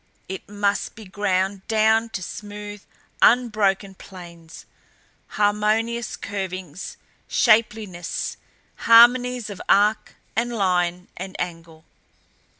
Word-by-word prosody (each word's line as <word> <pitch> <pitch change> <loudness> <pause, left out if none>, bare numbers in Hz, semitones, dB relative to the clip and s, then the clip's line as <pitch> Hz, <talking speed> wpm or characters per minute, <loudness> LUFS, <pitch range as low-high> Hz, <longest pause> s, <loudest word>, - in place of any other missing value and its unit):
It 190 +1 -7
must 205 -1 -1
be 220 - -11
ground 190 0 -1
down 220 +1 +3
to 185 - -8
smooth 205 +1 -8 0.4
unbroken 210 -5 +3
planes, 170 -3 -12 0.6
harmonious 215 +3 0
curvings, 185 -4 -6 0.3
shapeliness 215 -6 +1 0.4
harmonies 245 0 +5
of 195 - -8
arc 205 +2 +3 0.2
and 240 +2 0
line 180 -3 0
and 185 +1 -7
angle! 165 -2 -6
205 Hz, 90 wpm, -23 LUFS, 185-220 Hz, 0.6 s, harmonies